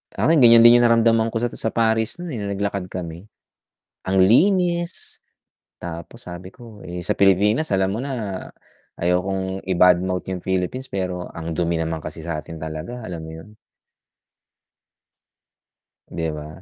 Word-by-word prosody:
Akin, 160 Hz, 0 st, +3 dB
ganiyan 115 Hz, -2 st, +8 dB
din 120 Hz, +1 st, +8 dB
'yung 120 Hz, -, +4 dB
naramdaman 115 Hz, -1 st, +3 dB
ko 115 Hz, -, -7 dB
sa 120 Hz, +1 st, 0 dB
sa -, -, -3 dB
Paris 110 Hz, -1 st, +1 dB
no'n, 175 Hz, -1 st, -7 dB
eh, 125 Hz, -, -4 dB
no'ng 100 Hz, -1 st, -3 dB
naglakad 100 Hz, -2 st, -2 dB
kami. 90 Hz, +1 st, -7 dB, 0.8 s
Ang 95 Hz, +1 st, 0 dB
linis, 175 Hz, -, +2 dB, 0.6 s
tapos 85 Hz, +8 st, -8 dB
sabi 90 Hz, +2 st, -9 dB
ko, 115 Hz, -4 st, -13 dB
eh, 90 Hz, 0 st, -5 dB
sa -, -, -1 dB
Pilipinas 100 Hz, -, +3 dB
alam 95 Hz, 0 st, +1 dB
mo 105 Hz, -, -3 dB
na, 115 Hz, -8 st, -4 dB, 0.5 s
ayokong 95 Hz, +2 st, -1 dB
i-bad 90 Hz, -1 st, +5 dB
mouth 90 Hz, 0 st, -2 dB
'yung 90 Hz, -, -3 dB
Philippines 95 Hz, +9 st, -2 dB
pero 90 Hz, -2 st, -4 dB
ang 85 Hz, 0 st, -5 dB
dumi 85 Hz, +1 st, 0 dB
naman 80 Hz, 0 st, -2 dB
kasi 80 Hz, +1 st, -8 dB
sa'tin 80 Hz, 0 st, -6 dB
talaga, 80 Hz, +10 st, -6 dB
alam 90 Hz, -5 st, -6 dB
mo -, -, -8 dB
'yon. 80 Hz, +6 st, -12 dB, 2.6 s
'Di 80 Hz, -1 st, -3 dB
ba? 75 Hz, +2 st, -9 dB
95 Hz, 150 wpm, -22 LUFS, 85-115 Hz, 2.6 s, ganiyan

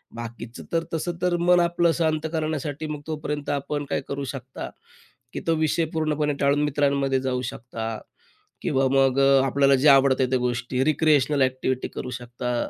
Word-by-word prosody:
बाकीचं 115 Hz, 0 st, -8 dB
तर 165 Hz, 0 st, +1 dB
तसं 165 Hz, +2 st, -1 dB
तर 180 Hz, -1 st, +2 dB
मन 175 Hz, +1 st, +4 dB
आपलं 170 Hz, 0 st, +2 dB
शांत 160 Hz, -1 st, 0 dB
करण्यासाठी, 155 Hz, -1 st, -3 dB
मग 150 Hz, -1 st, -5 dB
तोपर्यंत 150 Hz, -2 st, -4 dB
आपण 145 Hz, +1 st, -2 dB
काय -, -, -1 dB
करू 140 Hz, 0 st, -3 dB
शकता, 130 Hz, -1 st, -7 dB, 0.6 s
की -, -, -3 dB
तो 165 Hz, -, +3 dB
विषय 160 Hz, +1 st, +1 dB
पूर्णपणे 155 Hz, -2 st, 0 dB
टाळून 140 Hz, +1 st, +3 dB
मित्रांमध्ये 140 Hz, -2 st, +1 dB
जाऊ 130 Hz, -1 st, -1 dB
शकता 115 Hz, -2 st, -6 dB, 0.6 s
किंवा 135 Hz, -6 st, +1 dB
मग 135 Hz, -1 st, +3 dB
अ, 135 Hz, -1 st, +5 dB
आपल्याला 135 Hz, +1 st, +3 dB
जे 150 Hz, -, +4 dB
आवडते 135 Hz, -1 st, +5 dB
त्या 130 Hz, -, +2 dB
गोष्टी. 125 Hz, +1 st, -1 dB
रिक्रिएशनल 150 Hz, -1 st, +2 dB
ॲक्टिव्हिटी 130 Hz, 0 st, -1 dB
करू 125 Hz, -, -6 dB
शकता. 120 Hz, 0 st, -3 dB
140 Hz, 160 wpm, -24 LUFS, 130-155 Hz, 0.6 s, अ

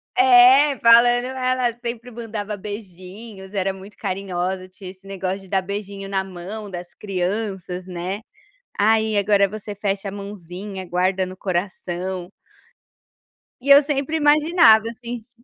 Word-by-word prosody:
É, 260 Hz, +3 st, +6 dB
falando: 240 Hz, +1 st, +6 dB
"Ela 255 Hz, -1 st, 0 dB
sempre 240 Hz, 0 st, -6 dB
mandava 220 Hz, -3 st, -5 dB
beijinhos, 195 Hz, 0 st, -9 dB
era 195 Hz, 0 st, 0 dB
muito 195 Hz, +2 st, -13 dB
carinhosa, 185 Hz, -1 st, -3 dB
tinha 185 Hz, 0 st, -10 dB
esse 190 Hz, +1 st, -19 dB
negócio 195 Hz, 0 st, -3 dB
de 195 Hz, -, -15 dB
dar 190 Hz, 0 st, 0 dB
beijinho 200 Hz, 0 st, -6 dB
na 195 Hz, -1 st, -1 dB
mão 190 Hz, +3 st, -8 dB
das 175 Hz, -2 st, -8 dB
crianças, 190 Hz, -1 st, -3 dB
né. 185 Hz, +3 st, -4 dB, 0.6 s
Aí 220 Hz, +1 st, +3 dB
agora 200 Hz, 0 st, +3 dB
você 210 Hz, +1 st, -7 dB
fecha 200 Hz, 0 st, -2 dB
a -, -, -8 dB
mãozinha, 195 Hz, -1 st, -7 dB
guarda 185 Hz, +1 st, +1 dB
no 185 Hz, 0 st, -10 dB
coração." 185 Hz, -1 st, -3 dB, 1.3 s
E 280 Hz, -, -4 dB
eu 280 Hz, +1 st, +9 dB
sempre 285 Hz, +1 st, -1 dB
imaginava 295 Hz, -7 st, +5 dB
assim, 235 Hz, +1 st, -6 dB
de 240 Hz, +1 st, -20 dB
200 Hz, 135 wpm, -22 LUFS, 190-235 Hz, 1.3 s, eu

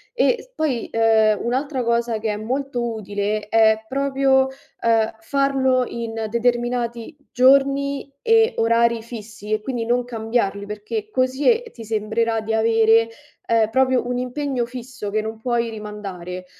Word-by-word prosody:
e -, -, +3 dB
s -, -, -14 dB
poi, 275 Hz, -7 st, -1 dB
ehm, 220 Hz, -2 st, +3 dB
un'altra 260 Hz, +2 st, -1 dB
cosa 235 Hz, -1 st, 0 dB
che 220 Hz, 0 st, -2 dB
è 210 Hz, -, -3 dB
molto 245 Hz, 0 st, -2 dB
utile, 210 Hz, 0 st, -3 dB
è 220 Hz, -1 st, +4 dB
proprio, 270 Hz, -1 st, +2 dB, 0.3 s
uhm, 225 Hz, -1 st, +2 dB
farlo 265 Hz, +1 st, +1 dB
in 225 Hz, -1 st, -4 dB
determinati 240 Hz, +2 st, -1 dB, 0.2 s
giorni 275 Hz, +2 st, +3 dB
e 455 Hz, +1 st, +4 dB
orari 230 Hz, 0 st, +2 dB
fissi 215 Hz, -2 st, -9 dB
e 215 Hz, -, +2 dB
quindi 235 Hz, 0 st, -3 dB
non 245 Hz, +1 st, +1 dB
cambiarli, 220 Hz, -4 st, -2 dB
perché 210 Hz, -, -5 dB
così 260 Hz, -, +1 dB
e 465 Hz, 0 st, +1 dB
ti 230 Hz, -, -10 dB
sembrerà 220 Hz, +1 st, -1 dB
di 220 Hz, +1 st, -3 dB
avere, 225 Hz, 0 st, +4 dB, 0.4 s
ehm, 225 Hz, -2 st, +3 dB
proprio 260 Hz, 0 st, +2 dB
un 245 Hz, 0 st, -1 dB
impegno 255 Hz, 0 st, -2 dB
fisso 245 Hz, -3 st, -7 dB
che 215 Hz, +2 st, 0 dB
non 220 Hz, +1 st, -5 dB
puoi 235 Hz, 0 st, 0 dB
rimandare, 195 Hz, -4 st, -7 dB
235 Hz, 145 wpm, -21 LUFS, 220-260 Hz, 0.4 s, è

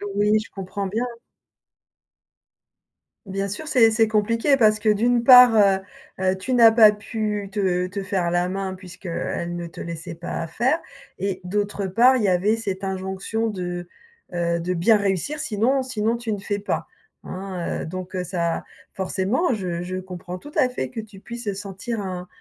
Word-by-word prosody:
Oui, 210 Hz, +1 st, +3 dB
je 215 Hz, -, -9 dB
comprends 195 Hz, +1 st, -4 dB
bien. 225 Hz, +6 st, -1 dB, 2.2 s
Bien 195 Hz, 0 st, -3 dB
sûr, 210 Hz, +11 st, -6 dB
c'est 235 Hz, -6 st, +5 dB
c'est 220 Hz, 0 st, +3 dB
compliqué 230 Hz, +6 st, +2 dB
parce 215 Hz, -4 st, +4 dB
que 215 Hz, +1 st, -4 dB
d'une 235 Hz, +3 st, +3 dB
part, 250 Hz, -2 st, +9 dB
heu 195 Hz, -2 st, +5 dB, 0.4 s
heu, 185 Hz, 0 st, +2 dB
tu 255 Hz, +7 st, -3 dB
n'as 230 Hz, -2 st, +8 dB
pas 220 Hz, -2 st, +8 dB
pu 210 Hz, -1 st, -3 dB
te 185 Hz, -3 st, 0 dB
te 195 Hz, +1 st, -5 dB
faire 190 Hz, -3 st, -1 dB
la 175 Hz, +1 st, +1 dB
main 190 Hz, 0 st, -3 dB
puisqu'elle 180 Hz, -2 st, -5 dB
ne 175 Hz, 0 st, -4 dB
te 165 Hz, -, -9 dB
laissait 170 Hz, +1 st, -6 dB
pas 165 Hz, 0 st, -5 dB
faire 255 Hz, -, +1 dB, 0.4 s
et 190 Hz, -1 st, -3 dB
d'autre 205 Hz, +1 st, -2 dB
part, 245 Hz, +7 st, +5 dB
il 220 Hz, -, -1 dB
y -, -, +3 dB
avait 190 Hz, +4 st, +3 dB
cette 195 Hz, -4 st, -4 dB
injonction 190 Hz, +4 st, -2 dB
de, 175 Hz, -4 st, -4 dB, 0.4 s
heu, 170 Hz, -1 st, 0 dB
de 180 Hz, +2 st, -2 dB
bien 180 Hz, +7 st, +4 dB
réussir, 200 Hz, -, -1 dB
sinon 245 Hz, +4 st, +1 dB
sinon 235 Hz, -2 st, -1 dB
tu 235 Hz, -2 st, -4 dB
ne 205 Hz, -, -2 dB
fais 205 Hz, +1 st, -3 dB
pas, 205 Hz, -, -2 dB, 0.4 s
hein. 185 Hz, -2 st, -4 dB
Heu, -, -, -5 dB
donc, 185 Hz, +2 st, -6 dB
heu, 180 Hz, -, -1 dB
ça 170 Hz, -2 st, -2 dB, 0.3 s
forcément, 195 Hz, -, 0 dB
je 175 Hz, -4 st, -3 dB
je 185 Hz, +1 st, -4 dB
comprends 180 Hz, -1 st, -7 dB
tout 290 Hz, -, -12 dB
à 265 Hz, -5 st, +3 dB
fait 130 Hz, -, -4 dB
que -, -, -6 dB
tu 215 Hz, -3 st, -10 dB
puisses 235 Hz, 0 st, -5 dB
sentir 205 Hz, +3 st, -5 dB
un 180 Hz, -2 st, -5 dB
200 Hz, 175 wpm, -23 LUFS, 185-225 Hz, 2.2 s, part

